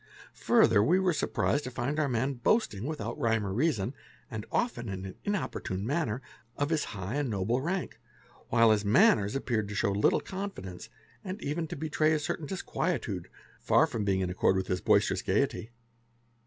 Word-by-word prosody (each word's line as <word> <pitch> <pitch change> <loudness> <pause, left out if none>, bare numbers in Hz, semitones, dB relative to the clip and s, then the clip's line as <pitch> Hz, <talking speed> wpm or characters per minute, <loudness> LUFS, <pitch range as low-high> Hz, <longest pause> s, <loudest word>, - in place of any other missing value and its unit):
Further 110 -3 +4
we 175 +11 +4
were 185 -2 +2
surprised 145 -1 0
to - - -3
find 130 +4 -2
our 150 -2 +1
man 130 +3 0
boasting, 120 - +1
without 135 -4 -4
rhyme 115 -5 +1
or 95 - -3
reason, 125 -3 0 0.4
and 110 -2 -5
often 125 - -1
in 95 -1 -5
an 95 - -7
importunate 105 - -2
manner, 135 -3 -1 0.3
of 145 +2 -1
his 160 -2 +1
high 105 +6 -4
and 145 -3 -1
noble 110 +5 0
rank, 180 +5 -3 0.5
while 115 -1 +5
his 105 -1 +2
manners 110 - +4
appeared 115 -6 -1
to 105 - -6
show 100 - +1
little 100 +1 +3
confidence, 185 - -7 0.3
and 190 +2 -5
even 160 +3 -2
to 175 - -6
betray 155 0 +1
a - - +3
certain 150 +1 -3
disquietude, 155 - -3 0.3
far - - +4
from 110 - -3
being 95 -1 +1
in 90 -1 -1
accord 95 +1 +2
with 95 0 0
his 90 0 -2
boisterous - - +3
gaiety. 110 - 0
120 Hz, 180 wpm, -29 LUFS, 100-155 Hz, 0.5 s, while